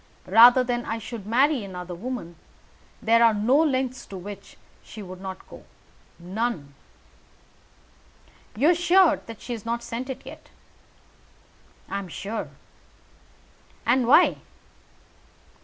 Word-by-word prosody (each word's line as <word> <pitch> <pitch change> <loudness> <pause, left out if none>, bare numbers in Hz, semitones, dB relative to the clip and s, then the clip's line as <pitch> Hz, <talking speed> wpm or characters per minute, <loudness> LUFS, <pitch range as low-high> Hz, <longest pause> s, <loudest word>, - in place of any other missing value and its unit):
Rather 240 +5 +7
than 240 -1 -2
I 225 - -3
should 225 -2 -8
marry 260 +2 +2
another 180 -2 -7
woman, 190 -3 -6 0.7
there 230 +1 +4
are 225 -2 +5
no 220 +6 +2
lengths 260 -5 0
to 195 - -8
which 200 +1 -10 0.2
she 215 - -10
would 185 0 -10
not 190 -1 -8
go - - -13 0.5
none." 180 -5 -4 1.8
"You 285 +10 +4
are - - +5
sure 350 +1 +4 0.2
she 245 - -7
has 225 -3 -7
not 235 +1 -3
sent 240 +3 -5
it 265 - -7
yet?" - - -12 1.4
"I 200 - -3
am 195 - -7
sure." 200 +6 -5 1.4
"And 245 0 +2
why?" 300 +8 +5
230 Hz, 125 wpm, -25 LUFS, 195-255 Hz, 1.8 s, Rather